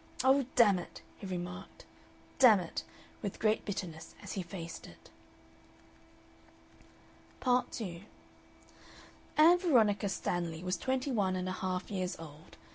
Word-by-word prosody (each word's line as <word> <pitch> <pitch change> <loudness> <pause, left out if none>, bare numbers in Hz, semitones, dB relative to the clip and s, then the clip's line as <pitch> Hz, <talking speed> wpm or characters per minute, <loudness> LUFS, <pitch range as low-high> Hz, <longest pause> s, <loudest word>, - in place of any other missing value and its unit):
"Oh, 265 0 +4
dammit!" 200 -7 +3 0.2
he 200 - -7
remarked, 180 - -6 0.5
"dammit!" 210 -10 +5 0.4
with 200 -3 -4
great 215 0 +2
bitterness 175 -6 -5
as - - -6
he 195 - -2
faced 170 -1 -7
it. - - -16 2.3
Part 250 -1 +2
2 180 -7 -5 1.4
Ann 335 +4 +7
Veronica 220 - +3
Stanley 175 -3 -2
was 180 +1 0
twenty 260 +5 -1
one 195 -6 +1
and 185 0 -2
a - - -1
half 185 0 -3
years 185 -2 -2
old. 155 -1 -12
190 Hz, 120 wpm, -32 LUFS, 180-240 Hz, 2.3 s, Ann